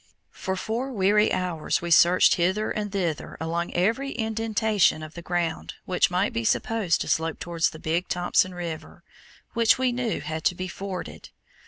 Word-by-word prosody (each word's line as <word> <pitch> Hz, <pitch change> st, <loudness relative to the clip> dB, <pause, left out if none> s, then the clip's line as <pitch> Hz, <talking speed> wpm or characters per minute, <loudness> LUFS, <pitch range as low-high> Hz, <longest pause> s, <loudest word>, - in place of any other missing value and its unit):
For 190 Hz, -1 st, -4 dB
four 230 Hz, +7 st, -3 dB
weary 210 Hz, -1 st, +3 dB
hours 180 Hz, -4 st, -1 dB
we 170 Hz, 0 st, -5 dB
searched 175 Hz, +2 st, +6 dB
hither 190 Hz, +5 st, 0 dB
and 210 Hz, -1 st, -3 dB
thither 175 Hz, -6 st, -3 dB
along 170 Hz, +2 st, -2 dB
every 230 Hz, +10 st, +1 dB
indentation 220 Hz, -6 st, +1 dB
of 155 Hz, 0 st, -9 dB
the 170 Hz, -, -8 dB
ground 170 Hz, -2 st, -2 dB
which 180 Hz, -, +2 dB
might 180 Hz, +3 st, 0 dB
be 115 Hz, -, -2 dB
supposed 200 Hz, -, +1 dB
to -, -, -3 dB
slope 160 Hz, 0 st, 0 dB
towards 170 Hz, -1 st, 0 dB
the -, -, -11 dB
Big 165 Hz, +3 st, -1 dB
Thompson 180 Hz, +1 st, +1 dB
River, 170 Hz, -3 st, -7 dB, 0.5 s
which 230 Hz, -2 st, +4 dB
we 260 Hz, -1 st, +1 dB
knew 240 Hz, -2 st, -2 dB
had 155 Hz, +1 st, -5 dB
to 180 Hz, -, +3 dB
be 185 Hz, +1 st, -4 dB
forded. 190 Hz, +1 st, -7 dB
180 Hz, 170 wpm, -25 LUFS, 170-215 Hz, 0.5 s, searched